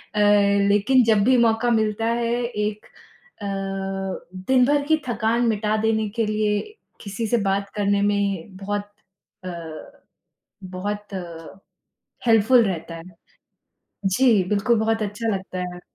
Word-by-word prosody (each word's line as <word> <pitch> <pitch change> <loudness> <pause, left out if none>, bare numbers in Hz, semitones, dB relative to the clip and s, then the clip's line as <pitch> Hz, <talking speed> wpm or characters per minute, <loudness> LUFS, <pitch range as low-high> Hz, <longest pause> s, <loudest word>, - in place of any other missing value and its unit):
अ, - - +1 0.5
लेकिन 235 +6 +4
जब 215 -3 +3
भी 255 +2 +4
मौका 225 +2 +1
मिलता 220 0 0
है, 235 0 0
एक 210 -2 -3 0.6
अ, - - -5 1.0
दिन 255 -1 +5
भर 290 +1 +2
की 315 - +4
थकान 235 0 +1
मिटा 215 -1 0
देने 220 -1 +1
के 230 - +1
लिए, 210 -1 0 0.4
किसी 210 +2 -4
से 240 - +2
बात 200 +1 0
करने 200 -1 +1
में 200 -2 -1
बहुत 205 +1 -4 0.5
अ, 165 -3 -8 0.6
बहुत 200 +3 -5 1.1
हेल्पफुल 230 +1 +5
रहता 165 -3 -4
है। 165 - -9 1.0
जी, 210 0 +3
बिल्कुल 210 +3 +2
बहुत 220 0 0
अच्छा 210 +2 -3
लगता 190 -1 -6 0.2
है। 180 - -10
210 Hz, 130 wpm, -23 LUFS, 200-230 Hz, 1.1 s, दिन